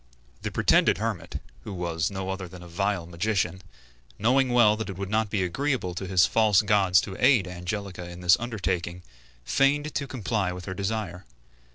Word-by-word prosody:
The - - -3
pretended - - +3
hermit, - - -3 0.2
who 105 - -6
was 85 -2 -1
no 95 -1 -4
other 95 -1 -5
than 90 0 -11
a - - -11
vile 100 +1 -1
magician, 90 0 -1 0.6
knowing 130 +4 +3
well 120 -4 +5
that 110 -1 -5
it 95 - -6
would 100 0 -5
not 110 -1 +1
be 100 -2 0
agreeable 105 0 -1
to 95 +2 -5
his 90 -1 +5
false 110 -3 +4
gods 95 -3 +4
to 95 - -6
aid 115 -10 +5
Angelica 90 0 -5
in 90 +1 -9
this 90 +1 +6
undertaking, 90 -6 -3 0.4
feigned 145 - +2
to 140 - -2
comply 105 -6 -1
with 90 0 -8
her 95 - -4
desire. 100 -2 -3
95 Hz, 180 wpm, -26 LUFS, 90-110 Hz, 0.6 s, this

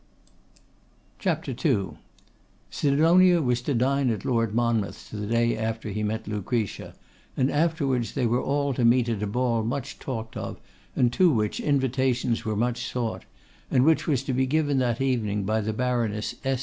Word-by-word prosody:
Sidonia 170 +5 +4
was 125 -5 0
to 135 +2 -1
dine 135 +2 +2
at 110 -5 -3
Lord 115 -3 0
Monmouth's 115 -3 -1
the 105 -1 -5
day 115 +1 +2
after 110 0 -3
he 105 +1 -3
met 110 +1 -2
Lucretia, 105 +1 -3 0.4
and 130 +1 +2
afterwards 145 -6 0
they 130 -3 +1
were 120 +2 +1
all 140 0 0
to 125 - -1
meet 120 0 +4
at 110 -3 -2
a 105 - -1
ball 120 +1 0
much 125 +3 -4
talked 115 -4 -5
of, - - -5 0.4
and 120 -1 +2
to 180 +6 +5
which 105 -5 0
invitations 130 -4 0
were 110 -1 -2
much 120 +2 -1
sought; 120 -3 -3 0.4
and 130 +1 +3
which 160 0 +3
was 135 -5 +1
to 135 - -2
be 130 +1 +1
given 145 -1 +1
that 120 -3 0
evening 110 -6 0
by 110 +3 0
the 110 +1 -2
Baroness 115 -3 -1
S. 135 -1 0
120 Hz, 160 wpm, -26 LUFS, 110-135 Hz, 0.4 s, to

